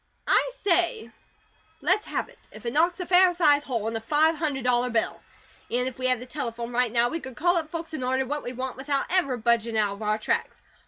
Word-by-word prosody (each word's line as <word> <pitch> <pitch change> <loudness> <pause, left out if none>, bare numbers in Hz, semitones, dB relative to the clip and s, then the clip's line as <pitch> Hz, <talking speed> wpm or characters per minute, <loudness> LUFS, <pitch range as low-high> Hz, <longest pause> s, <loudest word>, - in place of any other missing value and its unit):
I - - +3
say, 345 - 0 0.7
let's 425 - +1
have - - -2
it, - - -19
if 215 +2 -13
it 235 - -2
knocks 340 +4 +2
a 360 - -3
fair 360 +1 +5
sized 295 -4 +3
hole 230 -5 -2
in 225 - -3
a 225 - -3
five 300 +7 +3
hundred 290 -5 -2
dollar 250 0 +2
bill. 230 -2 -1 0.5
An' 250 +2 +1
if 260 -1 -5
we 255 - +1
had 255 -2 +2
the 250 - -8
telephone 240 -3 -5
right 245 -1 +1
now, 235 0 +3
we 330 - -3
could 265 -5 -9
call 350 +5 +2
up 320 -2 -2
folks 330 -1 -6
an' 310 - -4
order 260 +1 0
what 295 +3 -3
we 245 - -4
want 255 +1 -5
without 275 +1 -1
ever 280 -9 +1
budgin' 230 -1 +1
out 205 -2 +1
of 200 - -11
our 215 0 0
tracks. 215 - -2
255 Hz, 235 wpm, -26 LUFS, 235-315 Hz, 0.7 s, fair